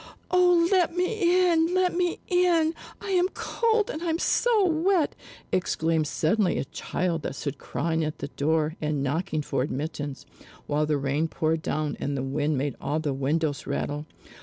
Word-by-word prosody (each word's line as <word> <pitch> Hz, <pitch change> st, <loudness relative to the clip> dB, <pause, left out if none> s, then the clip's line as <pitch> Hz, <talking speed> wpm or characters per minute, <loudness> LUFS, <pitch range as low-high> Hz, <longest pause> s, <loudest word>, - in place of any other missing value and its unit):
"Oh 355 Hz, -2 st, +5 dB
let 360 Hz, -3 st, +3 dB
me 365 Hz, -2 st, +3 dB
in! 330 Hz, +2 st, +2 dB
Let 370 Hz, -1 st, +2 dB
me 355 Hz, -1 st, +1 dB
in! 345 Hz, -3 st, +3 dB, 0.3 s
I 395 Hz, -, -5 dB
am 365 Hz, -1 st, +3 dB
cold, 445 Hz, -2 st, +1 dB
and 310 Hz, -, -6 dB
I'm 330 Hz, -2 st, 0 dB
so 445 Hz, +3 st, +3 dB
wet!" 335 Hz, 0 st, +2 dB, 0.4 s
exclaimed 165 Hz, -3 st, +1 dB
suddenly 180 Hz, +6 st, +1 dB
a -, -, -1 dB
child 170 Hz, +3 st, -2 dB
that 135 Hz, -, -4 dB
stood 140 Hz, -1 st, -4 dB
crying 165 Hz, -1 st, -1 dB
at 155 Hz, 0 st, -3 dB
the 140 Hz, -, -5 dB
door 155 Hz, +2 st, 0 dB
and 150 Hz, -2 st, -1 dB
knocking 155 Hz, +2 st, -1 dB
for 130 Hz, -, -1 dB
admittance, 145 Hz, 0 st, -4 dB, 0.4 s
while 150 Hz, +1 st, 0 dB
the 150 Hz, -1 st, +1 dB
rain 140 Hz, +3 st, 0 dB
poured 160 Hz, 0 st, -1 dB
down, 155 Hz, -2 st, -2 dB
and 140 Hz, 0 st, -2 dB
the 130 Hz, -, -2 dB
wind 145 Hz, +2 st, 0 dB
made 140 Hz, +1 st, -1 dB
all 145 Hz, +2 st, -1 dB
the 150 Hz, -3 st, -1 dB
windows 145 Hz, +2 st, -1 dB
rattle. 145 Hz, +1 st, -3 dB
160 Hz, 170 wpm, -26 LUFS, -, 0.4 s, Oh